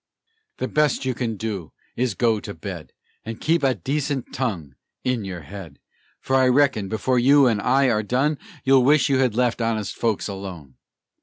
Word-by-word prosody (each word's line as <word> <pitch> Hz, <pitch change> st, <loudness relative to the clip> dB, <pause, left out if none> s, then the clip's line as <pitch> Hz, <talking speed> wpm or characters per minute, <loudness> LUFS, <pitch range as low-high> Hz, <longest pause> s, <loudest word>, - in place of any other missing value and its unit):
"The -, -, -2 dB
best 150 Hz, -3 st, +1 dB
you 130 Hz, -, 0 dB
can 115 Hz, -3 st, -3 dB
do 100 Hz, -6 st, -5 dB, 0.2 s
is 125 Hz, -1 st, 0 dB
to -, -, -24 dB
go 115 Hz, -3 st, +2 dB
to -, -, -8 dB
bed, -, -, -7 dB, 0.3 s
And 115 Hz, 0 st, -7 dB
keep 165 Hz, +2 st, +1 dB
a 135 Hz, -2 st, +2 dB
decent 140 Hz, -, -3 dB
tongue 90 Hz, -, -3 dB, 0.3 s
in 125 Hz, -5 st, -1 dB
your 90 Hz, -3 st, -6 dB
head; 80 Hz, -1 st, -10 dB, 0.4 s
For 135 Hz, -, -1 dB
I 130 Hz, -1 st, +4 dB
reckon, 125 Hz, -7 st, +2 dB
before 125 Hz, +3 st, +1 dB
you 140 Hz, +3 st, +6 dB
and 110 Hz, -4 st, +2 dB
I 135 Hz, +3 st, +3 dB
are 105 Hz, -1 st, +1 dB
done, 135 Hz, +7 st, 0 dB, 0.2 s
You'll 135 Hz, -1 st, +5 dB
wish 150 Hz, +2 st, +4 dB
you 135 Hz, -1 st, +2 dB
had 125 Hz, -5 st, +1 dB
left 120 Hz, -1 st, +1 dB
honest 110 Hz, -3 st, -1 dB
folks 115 Hz, -3 st, -1 dB
alone." 95 Hz, -9 st, -8 dB
120 Hz, 185 wpm, -23 LUFS, 105-135 Hz, 0.4 s, you